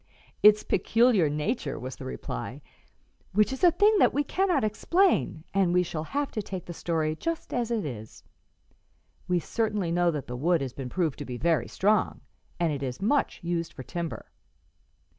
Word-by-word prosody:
"Its 210 0 +7
peculiar 220 -4 +3
nature," 150 - -2
was 130 0 -6
the 130 - -8
reply, - - -5 0.7
"which 210 +6 +3
is 265 - -7
a 355 - +9
thing 410 +6 +4
that - - +4
we 290 - +2
cannot 360 - +1
explain, 215 - +1
and 185 -3 +2
we 180 - +4
shall 160 -2 -4
have 285 - -2
to 215 - -2
take 190 -3 -6
the 175 - -7
story 160 -2 -1
just 330 - -4
as 240 -2 -1
it 225 -6 -1
is. 110 -6 -8 1.0
We 180 -1 +2
certainly 210 -1 -1
know 175 0 +3
that 150 -4 -3
the 125 - -6
wood 165 +5 +2
has 130 -2 -4
been 130 -2 -6
proved 165 -1 -1
to - - -5
be 125 -1 -5
very 165 +3 +1
strong, 210 +1 +1 0.4
and 170 -3 +1
it 140 - -4
is 130 -2 -4
much 260 +3 0
used 170 -1 -2
for 130 - -8
timber." 170 +3 -5
175 Hz, 180 wpm, -27 LUFS, 155-225 Hz, 1.0 s, a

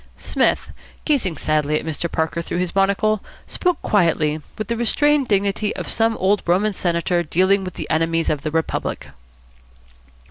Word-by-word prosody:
Psmith, - - 0 0.3
gazing 230 - +1
sadly 150 0 +1
at - - -9
Mr. 160 +1 -3
Parker 160 +1 -1
through 170 - -4
his 180 -1 -1
monocle, 200 +2 +2 0.2
spoke 360 -3 0
quietly, 160 -6 +2 0.2
with 215 -2 -4
the 235 - -1
restrained 280 +4 +2
dignity 200 0 0
of - - -5
some 225 0 +1
old 195 +2 +2
Roman 195 +5 +2
senator 175 -1 0
dealing 185 +4 +2
with 185 -1 -6
the - - -5
enemies 165 +1 +1
of 150 -2 -2
the 155 - -2
Republic. 160 +1 -2
185 Hz, 155 wpm, -21 LUFS, 165-215 Hz, 0.3 s, monocle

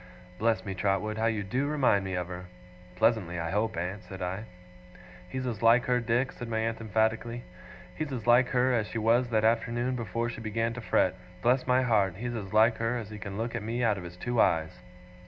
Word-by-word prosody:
'Bless 110 -3 +1
me, 95 - -3
Trotwood, 100 +3 -1
how 110 - +2
you 110 -3 0
do 125 +8 -1
remind 135 -9 +2
me 95 -1 -3
of 90 0 -1
her!' 90 0 -7 0.5
'Pleasantly, 90 -4 +1
I 85 0 -3
hope, 105 +1 0
aunt?' 90 +5 -3
said 95 - -9
I. 95 +4 -3 0.8
'He's 130 +5 -4
as 115 -4 -3
like 115 +1 +5
her, 125 0 +2
Dick,' 120 +3 0
said 120 - -8
my 110 - -1
aunt, 115 0 -1
emphatically, 110 +2 0 0.5
'he's 155 +7 -4
as 125 -5 -4
like 120 +1 +5
her, 125 0 +2
as 110 -3 +1
she - - -5
was 115 +3 +3
that 110 -2 +1
afternoon 120 +2 +1
before 115 0 -2
she 120 -1 -6
began 115 +1 -1
to 125 - -6
fret 95 -4 +2 0.3
bless 125 +2 +2
my 125 +1 +4
heart, 100 -7 +2
he's 120 +2 -4
as 100 -5 -5
like 110 +1 +4
her, 115 +2 0
as 110 -3 -7
he 105 - -7
can 100 0 -6
look 115 +2 -3
at 115 - -3
me 115 +3 -2
out 105 -4 +2
of - - -8
his 90 +1 -9
two 120 +4 +1
eyes! 80 +2 +1
115 Hz, 225 wpm, -29 LUFS, 100-120 Hz, 0.8 s, like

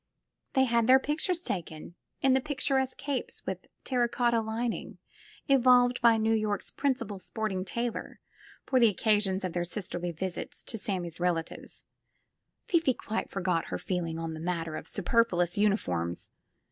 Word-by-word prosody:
They 265 - +4
had 235 -2 +2
their 260 +1 +8
pictures 315 +6 -1
taken, 170 - -5 0.3
in 265 -1 +4
the 265 - +3
picturesque 270 -2 0
capes 275 -2 -4
with - - -5 0.2
terra 245 -3 +1
cotta 235 -1 +2
lining 225 +2 -3 0.5
evolved 250 -2 +5
by 230 -1 +6
New 220 0 +2
York's 215 -2 -1
principal 230 -8 -1
sporting 195 -2 -3
tailor 235 +4 -4 0.5
for 260 - +3
the 230 -2 +7
occasions 205 -2 +1
of 185 -2 -2
their 175 - 0
sis 175 +2 -3
terly 175 0 -3
visits 190 - -4
to 225 - -4
Sammie's 180 -6 -3
relatives 175 -2 -3 0.4
— - - -53
Fifi 325 -8 +3
quite 220 -1 -3
forgot 180 -3 0
her - - -3
feeling 170 -3 -2
in 165 -1 -4
the 160 - -7
matter 165 -1 -2
of - - -7
superfluous 180 -4 +1
uniforms! 90 - 0
220 Hz, 155 wpm, -29 LUFS, 180-250 Hz, 0.5 s, their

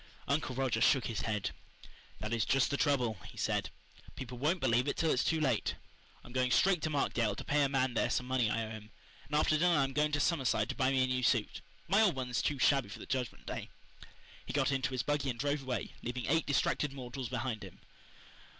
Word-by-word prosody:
Uncle 140 -2 0
Roger 130 -4 0
shook 130 -2 +4
his 115 - -2
head. 105 -3 -2 0.7
"That 105 +2 -3
is 115 -2 +1
just 135 +3 +2
the - - +1
trouble," 125 - +1
he - - -14
said. - - 0 0.5
"People 125 -2 -7
won't 160 +7 +1
believe 125 -1 +2
it - - -1
till 160 -1 +2
it's 125 - +2
too 160 - +1
late. 130 -8 0 0.5
I'm 120 - -12
going 130 0 +1
straight 175 +8 +3
to 155 - -1
Markdale 120 -7 0
to - - -6
pay 145 +1 +2
a 140 - +3
man 130 -2 +1
there - - +1
some 125 - 0
money 125 -3 +1
I 115 +1 -1
owe 110 - -8
him, 110 -1 -9 0.4
and 150 - -3
after 155 0 +3
dinner 175 -1 +4
I'm 135 -1 +1
going 150 +1 +2
to 145 - +2
Summerside 140 -5 +1
to - - -3
buy 130 -2 +2
me 135 -1 +3
a - - +3
new 130 0 -1
suit. 120 -3 +1 0.3
My 200 +5 +4
old 200 -8 +4
one 130 -1 -4
is 120 - +1
too 145 - 0
shabby 135 -4 +3
for 105 - -7
the - - -9
Judgment 130 -3 -3
Day." - - -5 0.7
He - - -7
got 140 -1 +2
into 130 -2 0
his 130 -2 -2
buggy 145 -2 0
and 120 - -3
drove 145 +3 0
away, 130 -2 -3
leaving 125 +1 -4
eight 160 +2 +1
distracted 140 0 +1
mortals 130 -1 -6
behind 120 -3 -3
him. 95 -2 -11
130 Hz, 230 wpm, -33 LUFS, 120-145 Hz, 0.7 s, shook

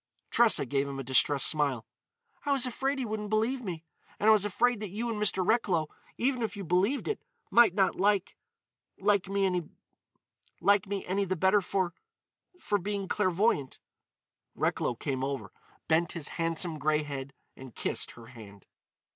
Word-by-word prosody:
Tressa 235 -10 +5
gave 140 +2 0
him 140 -1 -5
a 135 - -4
distressed 135 +2 +3
smile: 140 -7 +1 0.6
"I 285 - -1
was 270 -3 +2
afraid 270 +3 -1
he 260 - -2
wouldn't 210 -1 -4
believe 225 +5 +1
me. 175 -7 -5 0.4
And 210 - +1
I - - +9
was 210 -2 +3
afraid 240 +3 +1
that 210 -2 -5
you 230 +5 -3
and 210 -2 -4
Mr. 190 -3 +2
Recklow, 185 -8 +1 0.3
even 255 0 0
if 220 -2 -3
you 200 - -5
believed 190 - +1
it, 430 - -2 0.3
might 230 -6 +6
not 195 -2 +3
like—like 200 0 -2
me 200 0 +1
any 195 +2 -2
the 185 0 -1
better 190 +4 +3
for—for 195 - -4
being 200 +1 -3
clairvoyant." 185 - +1 0.8
Recklow 120 - 0
came 130 +1 -3
over, 135 0 -3 0.4
bent 165 0 +2
his 160 -4 -5
handsome 165 -1 -2
grey 155 0 +1
head, 140 -2 -6 0.2
and 130 -4 -12
kissed - - -2
her 115 - -11
hand. 110 -5 -13
190 Hz, 155 wpm, -29 LUFS, 150-215 Hz, 0.8 s, I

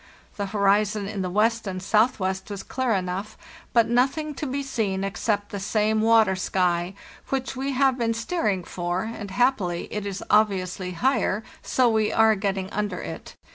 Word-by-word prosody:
The 200 -1 -3
horizon 205 +1 +2
in 200 -1 -4
the 185 - -2
west 220 +3 +1
and 185 -1 -3
south 215 +6 +2
west 190 +1 -2
was 200 -2 -5
clear 260 -2 -1
enough, 190 +2 -2 0.3
but 230 -2 +4
nothing 270 +6 +1
to 295 - -4
be 280 +2 -2
seen 210 -8 -1
except 205 +2 -1
the 200 - -5
same 215 +2 +1
water 225 -3 +4
sky, 180 -1 0 0.3
which 265 -1 -2
we 270 +2 -2
have 265 -1 +2
been 230 -1 +1
steering 225 - -1
for, 175 +1 -3
and, 220 -2 -6
happily, 190 -6 +1
it 210 -1 -3
is 195 -1 -5
obviously 190 -3 +1
higher, 225 0 +1 0.2
so 255 -1 +2
we 220 -2 +2
are 220 0 +5
getting 195 -2 -2
under 210 0 -2
it. - - -8
210 Hz, 175 wpm, -25 LUFS, 190-230 Hz, 0.3 s, are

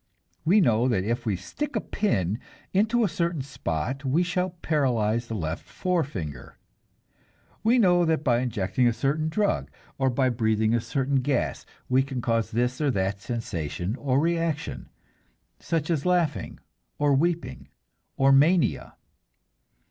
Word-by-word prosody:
We 200 +6 +5
know 120 - +3
that 110 -7 +1
if 120 +3 -2
we 105 - +1
stick 295 - -5
a - - +2
pin 110 - -1 0.3
into 220 +5 +3
a - - +3
certain 170 -5 -1
spot 130 - -3
we 145 +6 +2
shall 180 +1 -1
paralyze 120 -6 +1
the 115 - -4
left 80 -3 -3
forefinger. 140 - -3 1.1
We 230 +3 +4
know 180 -6 +4
that 160 -2 +1
by 120 -4 +3
injecting 120 -1 0
a 120 - +3
certain 140 +7 0
drug, 205 +5 0 0.3
or 135 -1 +3
by 130 +1 +2
breathing 110 -2 +1
a 120 - +2
certain 135 +2 0
gas, 130 0 -1 0.2
we 130 +1 +3
can 135 -1 -4
cause 115 -1 0
this 125 +4 -1
or 150 - +2
that 100 -4 -1
sensation 100 - -3
or 135 -1 +1
reaction, 165 -1 -1 0.7
such 165 0 -1
as 150 -4 0
laughing 175 -5 0 0.4
or 145 -1 +3
weeping 170 +4 -1 0.5
or 135 0 +4
mania. 155 +6 +3
135 Hz, 145 wpm, -26 LUFS, 115-165 Hz, 1.1 s, We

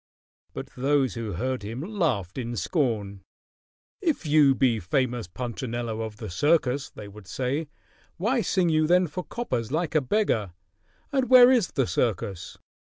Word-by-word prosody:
But - - -6
those 135 0 +1
who 115 -4 -4
heard 130 +7 -2
him 115 +5 -6
laughed 150 - -1
in 120 -1 -4
scorn. 105 - -1 0.8
"If 325 - 0
you 145 -3 +5
be 125 -5 +2
famous 120 +3 -1
Punchinello 120 +1 -4
of 110 -1 -6
the 110 -1 -7
circus," 140 - +1
they 105 - -10
would 100 -1 -13
say, 135 - -2 0.5
"why 230 +8 +1
sing 185 -5 +1
you 155 -1 +2
then 180 +2 +4
for 175 +3 -5
coppers 125 - -3
like 160 +2 -1
a 155 - +3
beggar, 125 - 0 0.6
and 265 -2 0
where 255 -1 +9
is 240 -7 +3
the 135 - 0
circus? 100 -6 -2
130 Hz, 155 wpm, -26 LUFS, 110-165 Hz, 0.8 s, where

